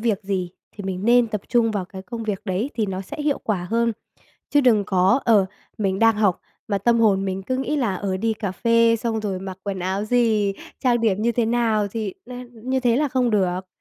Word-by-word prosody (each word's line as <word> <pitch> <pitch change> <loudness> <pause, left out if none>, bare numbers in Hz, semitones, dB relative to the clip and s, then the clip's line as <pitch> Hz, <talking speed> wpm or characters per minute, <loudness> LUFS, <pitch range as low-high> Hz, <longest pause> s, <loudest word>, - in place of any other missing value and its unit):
việc 220 -3 0
gì 190 -3 -2 0.2
thì 205 - -9
mình 190 0 -3
nên 240 +1 +5
tập 215 -2 -3
trung 235 -2 +3
vào 205 -3 -2
cái 190 +1 -10
công 230 +3 -6
việc 210 -3 -3
đấy 205 +7 -2
thì 220 -3 0
nó 190 -1 -3
sẽ 195 - -8
hiệu 290 -1 +1
quả 190 -5 -1
hơn. 230 0 +2 0.6
Chứ 290 - +4
đừng 230 -6 +4
có, 190 +7 +3
ờ, 210 -5 +4 0.3
mình 195 -2 0
đang 225 0 +4
học 205 -4 +2 0.3
mà 200 - 0
tâm 235 +4 +2
hồn 195 -3 +3
mình 190 0 -3
cứ 255 +6 -2
nghĩ 270 +3 -1
là, 235 -9 0
ờ, 190 0 -2
"Đi 225 +4 0
cà 205 -3 -4
phê 230 +2 +3
xong 225 -1 -2
rồi 200 -3 -3
mặc 190 0 -7
quần 200 -2 -4
áo 190 +3 -2
gì? 215 -3 +2 0.3
Trang 240 -2 +3
điểm 210 -3 +1
như 235 +1 +2
thế 235 0 +1
nào?" 225 -3 +1
Thì 215 -3 -4 0.2
n 245 -1 -8
như 265 0 +2
thế 240 -2 +2
là 295 +2 +1
không 250 -2 +1
được. 185 -2 0
215 Hz, 235 wpm, -22 LUFS, 195-235 Hz, 0.6 s, nên